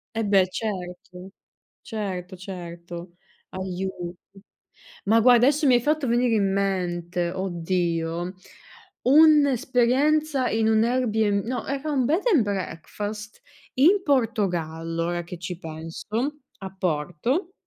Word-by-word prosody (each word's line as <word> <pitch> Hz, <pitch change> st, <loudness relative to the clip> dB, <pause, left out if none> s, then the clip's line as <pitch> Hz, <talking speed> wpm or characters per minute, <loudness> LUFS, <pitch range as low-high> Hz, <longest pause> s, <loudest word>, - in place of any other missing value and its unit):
Eh 225 Hz, -, 0 dB
beh, 195 Hz, -2 st, +4 dB
certo, 180 Hz, -3 st, -6 dB, 0.5 s
certo, 190 Hz, -5 st, -5 dB
certo. 175 Hz, -1 st, -8 dB, 0.3 s
Aiuto! 185 Hz, -1 st, -5 dB, 0.9 s
Ma 225 Hz, +3 st, +4 dB
guarda 245 Hz, +1 st, +6 dB
adesso 295 Hz, +3 st, +2 dB
mi 255 Hz, -, +6 dB
hai 240 Hz, -, +4 dB
fatto 295 Hz, +1 st, 0 dB
venire 240 Hz, 0 st, +2 dB
in 200 Hz, -3 st, +2 dB
mente, 180 Hz, -3 st, -1 dB
oddio, 175 Hz, -1 st, -2 dB, 0.7 s
un'esperienza 280 Hz, 0 st, +4 dB
in 220 Hz, 0 st, +1 dB
un 220 Hz, 0 st, +4 dB
Airbn 220 Hz, -4 st, +1 dB
no 250 Hz, +3 st, -3 dB
era 275 Hz, +2 st, -2 dB
un 265 Hz, -3 st, +1 dB
bed 320 Hz, +10 st, +1 dB
and 280 Hz, -, +5 dB
breakfast, 205 Hz, +2 st, -5 dB, 0.3 s
in 355 Hz, +10 st, +4 dB
Portogallo, 175 Hz, -, 0 dB
ora 175 Hz, 0 st, -2 dB
che 175 Hz, +1 st, -8 dB
ci 180 Hz, 0 st, -5 dB
penso, 160 Hz, -1 st, -8 dB, 0.5 s
a 190 Hz, -1 st, -8 dB
Porto. 185 Hz, -, -1 dB
200 Hz, 115 wpm, -25 LUFS, 175-250 Hz, 0.9 s, guarda